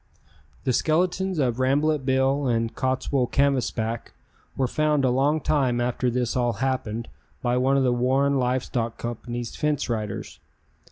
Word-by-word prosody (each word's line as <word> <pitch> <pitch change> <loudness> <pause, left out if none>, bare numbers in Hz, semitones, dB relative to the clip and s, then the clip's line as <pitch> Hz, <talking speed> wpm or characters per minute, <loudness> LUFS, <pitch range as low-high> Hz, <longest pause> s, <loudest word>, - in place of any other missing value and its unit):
The 130 - +1
skeletons 180 +6 +1
of 125 -4 0
Rambolet 145 +3 +2
Bill 135 +1 +2
and 115 -1 0
Cottswool 130 0 0
Canvasback 120 -5 0 0.4
were 135 - +2
found 150 +1 +1
a 125 - +3
long 140 +5 +2
time 135 -5 +1
after 125 +1 0
this 120 -1 -1
all 120 -2 +1
happened 120 -4 -2 0.4
by 120 0 +1
one 135 +2 +3
of 135 - +3
the 125 -1 +3
Warren 135 +3 +2
Live 125 0 +1
Stock 115 -2 -3
Company's 120 0 -5
fence 150 -3 -1
riders. 110 -3 -4
130 Hz, 150 wpm, -25 LUFS, 120-140 Hz, 0.4 s, a